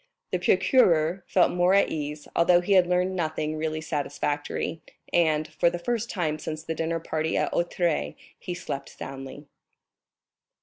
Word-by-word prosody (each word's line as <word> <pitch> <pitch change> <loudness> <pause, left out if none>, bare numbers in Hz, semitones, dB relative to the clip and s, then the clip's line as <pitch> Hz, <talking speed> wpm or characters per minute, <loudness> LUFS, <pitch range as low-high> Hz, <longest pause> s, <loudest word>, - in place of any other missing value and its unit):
The 180 - 0
procureur 180 -3 +3
felt 180 - +3
more 180 +2 +3
at 200 - +4
ease, 150 -1 -5
although 175 +1 +5
he 200 +3 +1
had 185 -2 +5
learned 180 +1 +1
nothing 155 -2 -2
really 155 0 -2
satisfactory, 145 +1 -3 0.3
and, 155 -3 +2
for 170 - +2
the 175 - -4
first 235 +5 -2
time 155 -4 -1
since 155 0 -5
the 160 - -3
dinner 165 +1 -2
party 160 0 -2
at - - 0
Auteuil, 170 -1 0 0.2
he 180 - -5
slept 140 -6 -5
soundly. 135 +2 -8
165 Hz, 150 wpm, -26 LUFS, 155-180 Hz, 0.3 s, although